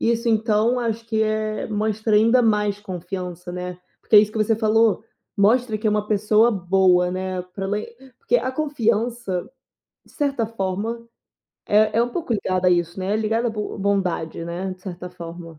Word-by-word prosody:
Isso 235 +1 +1
então 220 +2 +2
acho 230 -1 -2
que 220 -1 -1
é 215 0 -1
mostra 215 0 -1
ainda 230 +4 +5
mais 210 -2 +1
confiança, 180 -2 -6
né. 180 0 -5 0.2
Porque - - -1
é - - +12
isso 210 0 0
que 220 - -4
você 215 +1 +2
falou, 225 0 +3 0.3
mostra 220 +3 +3
que 215 - -3
é - - +4
uma 210 0 0
pessoa 215 +2 +3
boa, 180 -2 +3
né, 185 0 -3
pra 195 - -4
ela 205 +2 -1
ir 210 - -6 0.3
porque 460 +2 +1
a 260 - -1
confiança 235 - -1 0.6
de - - -21
certa 275 -6 -1
forma 225 +2 -4 0.6
é 215 +1 +3
é - - +5
um 240 - -2
pouco 315 -2 -3
ligada 185 -3 +1
a - - +3
isso, 175 0 0
né, 190 +2 -1
é - - +2
ligada 225 +2 0
a - - -2
bo 210 -1 -5
bondade, 185 -5 -1
né, 180 +3 -4
de 185 - -26
certa 180 -1 -7
forma. 170 -2 -9
210 Hz, 190 wpm, -22 LUFS, 185-225 Hz, 0.6 s, é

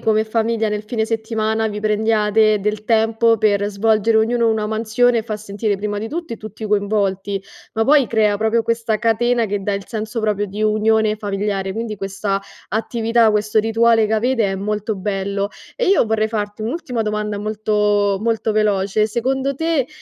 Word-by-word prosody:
come 220 0 +2
famiglia 225 0 0
nel 210 0 -3
fine 220 0 -1
settimana 220 0 -1
vi 210 -1 -4
prendiate 215 0 +2
del 210 +1 -2
tempo 225 0 +2
per 205 -1 +2
svolgere 220 +2 +2
ognuno 230 +1 +2
una 220 -1 0
mansione 225 +2 +1
fa 215 -2 -4
sentire, 205 0 -2
prima 205 +1 -3
di 220 +2 -4
tutti, 325 -7 -5
tutti 215 +1 -9
coinvolti, 200 -2 0 0.3
ma 225 - 0
poi 280 -2 +5
crea 210 -2 +2
proprio 220 +2 +1
questa 230 -1 0
catena 230 +1 +1
che 205 0 -2
dà 205 - 0
il 200 0 -3
senso 220 +1 -4
proprio 205 -1 0
di 205 +3 -5
unione 215 0 +2
familiare, 200 -2 -2
quindi 220 -1 -4
questa 195 +1 -2 0.3
attività, 225 0 +1
questo 210 +1 +1
rituale 225 0 +3
che 220 - -3
avete 235 0 +1
è - - -2
molto 210 +2 -2
bello; 200 0 -2 0.3
e - - -1
io 380 - +4
vorrei 220 0 +1
farti 210 -1 -4
un'ultima 250 -2 -3
domanda 210 -1 -2
molto 210 -1 +1
molto 225 -1 0
veloce, 210 0 +1
secondo 265 +4 -1
te, 320 -5 0
215 Hz, 170 wpm, -19 LUFS, 210-225 Hz, 0.3 s, poi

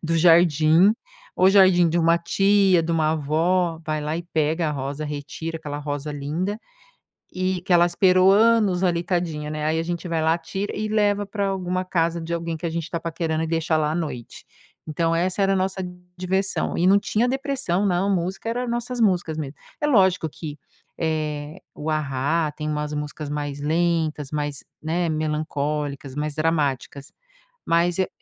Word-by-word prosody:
do 165 0 -1
jardim. 165 +2 +5 0.4
Ou 185 - +5
jardim 185 -3 +5
de 165 +2 0
uma 170 0 +4
tia, 195 0 +3
de 165 +1 -2
uma 155 -1 +2
avó 165 +3 0
vai 155 -1 -1
lá 150 +1 -2
e 170 - -4
pega 160 -1 0
a - - -1
rosa, 140 +2 -4
retira 150 +3 -5
aquela 145 -2 -6
rosa 145 0 -4
linda 165 +9 -3 0.7
e 185 -1 -1
que 185 - -1
ela 175 0 +6
esperou 185 +1 +4
anos 210 -3 +4
ali, 170 -2 +1
tadinha, 170 -4 -2
né. 155 0 -3
Aí, 155 +1 +1
a - - 0
gente 170 +1 -4
vai 165 -1 0
lá, 160 +1 +3
tira 195 +4 -5
e 215 - -2
leva 205 -1 +1
pra 200 0 -2
alguma 185 -1 -2
casa 170 -2 0
de 165 +1 -3
alguém 170 0 -3
que 170 - -5
a - - -2
gente 165 0 -4
tá 170 - -3
paquerando 160 -1 -2
e - - -3
deixa 165 0 0
lá 150 0 0
à - - -2
noite. 150 -8 -5 0.4
Então, 165 +2 0
essa 185 +3 0
era 195 0 +3
a - - +1
nossa 190 0 -1 0.4
diversão 190 +2 -1
e 175 - +2
não 195 +2 +6
tinha 220 +4 +1
depressão 265 -8 -1
não! 190 +1 +1
Música 185 +4 -3
era 245 +1 -2
nossas 240 +1 -3
músicas 180 -7 +1
mesmo. 145 -2 -5 0.2
É 295 - +1
lógico 190 - +3
que, 150 -1 -8 0.4
eh, 155 0 -3
o 155 +2 -4
A-ha 150 +1 0
tem 150 +1 -5
umas 150 0 -3
músicas 150 0 -5
mais 145 -1 -3
lentas, 160 -2 0
mais, 145 -2 -3 0.2
né, 170 +2 0
melancólicas, 150 -3 -2
mais 150 +1 -3
dramáticas, 145 -3 -1 0.6
mas 170 +1 +2
e 190 - +1
165 Hz, 180 wpm, -23 LUFS, 155-185 Hz, 0.7 s, ela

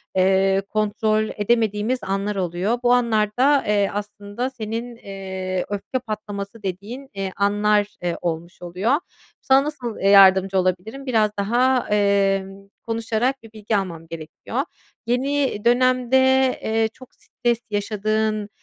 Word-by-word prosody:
eee, 190 +1 +3
kontrol 215 0 0
edemediğimiz 220 +2 +1
anlar 195 +1 -2
oluyor. 185 +6 -1
Bu 245 0 +4
anlarda, 245 +4 +2
eee, 205 -1 +2
aslında 205 +4 -4
senin, 230 0 -5
eee, 190 -3 -5
öfke 205 +5 -3
patlaması 210 -2 -6
dediğin, 210 +9 -6
eee, 195 -1 -3
anlar, 205 +1 +2 0.2
eee, 175 -1 -1
olmuş 170 +1 -4
oluyor. 180 +8 -1 0.5
Sana 270 +1 +4
nasıl, 260 -7 -5
eee, 195 - +2
yardımcı 195 -1 +6
olabilirim 185 +9 -1
biraz 220 -5 +2
daha, 245 +5 +2
eee, 200 -2 +2 0.4
konuşarak 230 +3 -1
bir 225 - -13
bilgi 215 0 -2
almam 170 -4 -5
gerekiyor. 160 -1 -8 0.5
Yeni 265 -2 0
dönemde, 255 +1 +3 0.5
eee, 220 0 +1
çok 255 - -15
stres 235 -1 -2
yaşadığın, 215 0 -1
210 Hz, 120 wpm, -22 LUFS, 195-235 Hz, 0.5 s, yardımcı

